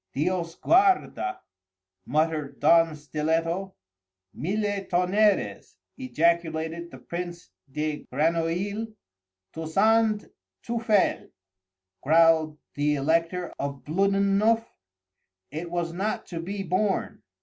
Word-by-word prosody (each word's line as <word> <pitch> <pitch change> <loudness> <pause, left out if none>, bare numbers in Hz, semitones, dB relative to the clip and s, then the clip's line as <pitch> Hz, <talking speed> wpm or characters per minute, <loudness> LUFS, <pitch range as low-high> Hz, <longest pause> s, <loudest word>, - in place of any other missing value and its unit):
"Dios 170 +3 -1
guarda!" 375 - +2 0.7
muttered 155 0 -1
Don 165 -2 +4
Stiletto. 165 +6 -2 0.6
"Mille 205 +4 -2
tonnerres!" 190 +4 +1 0.2
ejaculated 170 - 0
the - - -11
Prince 175 0 -7 0.2
de 150 +1 -3
Grenouille. 170 - 0 0.7
"Tousand 210 +7 +2 0.4
teufel!" 225 -4 +1 0.7
growled 160 0 +4 0.2
the 150 +1 +1
Elector 165 +5 0
of 140 -1 -4
Bluddennuff. 200 +6 +2 0.9
It 165 +3 -5
was 170 -1 -2
not 200 +5 -2
to 170 - -5
be 195 +4 -4
borne. 190 +3 -1
170 Hz, 85 wpm, -26 LUFS, 160-200 Hz, 0.9 s, Don